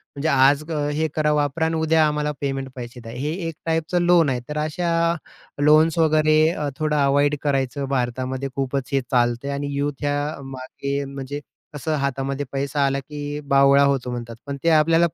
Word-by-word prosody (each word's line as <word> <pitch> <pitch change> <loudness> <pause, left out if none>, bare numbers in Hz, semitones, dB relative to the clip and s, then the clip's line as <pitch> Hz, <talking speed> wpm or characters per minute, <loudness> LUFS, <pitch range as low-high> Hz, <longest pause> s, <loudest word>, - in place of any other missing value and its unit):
म्हणजे 140 +3 -2
आज 140 +2 +4 0.3
हे 160 +2 0
करा, 150 -1 +2
वापरा 150 +2 0
अन 160 - 0
उद्या 160 0 +3
आम्हाला 150 0 -1
पेमेंट 135 -1 -2
पैसे 120 -1 -8
द्या. 115 -1 -9
हे 140 +5 -3 0.2
एक 165 - -4
टाईपचं 165 +2 0
लोन 175 -3 +4
आहे, 125 -2 0
तर 150 - -4
अशा 155 +3 -1 0.7
लोन्स 155 +2 +5
वगैरे 155 -1 +4
अ, 150 -4 -3
थोडं 155 -1 0
अवॉइड 145 +1 +3
करायचं. 135 -1 -1
भारतामध्ये 130 +1 -2
खूपच 135 -1 -2
हे 135 - +3
चालतंय 120 +2 +1
आणि 140 0 -3
युथ 145 +1 0
ह्या 145 +1 -1
मागे 140 +2 -4
म्हणजे, 140 +1 -6 0.3
कसं 155 +2 -2
हातामध्ये 140 +1 -2
पैसा 140 +1 0
आला, 135 0 0
की 145 +1 -6 0.2
बावळा 140 +1 +6
होतो 135 -3 +1
म्हणतात. 120 -1 -6
पण 140 0 -5
ते 165 - +3
आपल्याला 165 +2 +4
145 Hz, 175 wpm, -22 LUFS, 135-155 Hz, 0.7 s, बावळा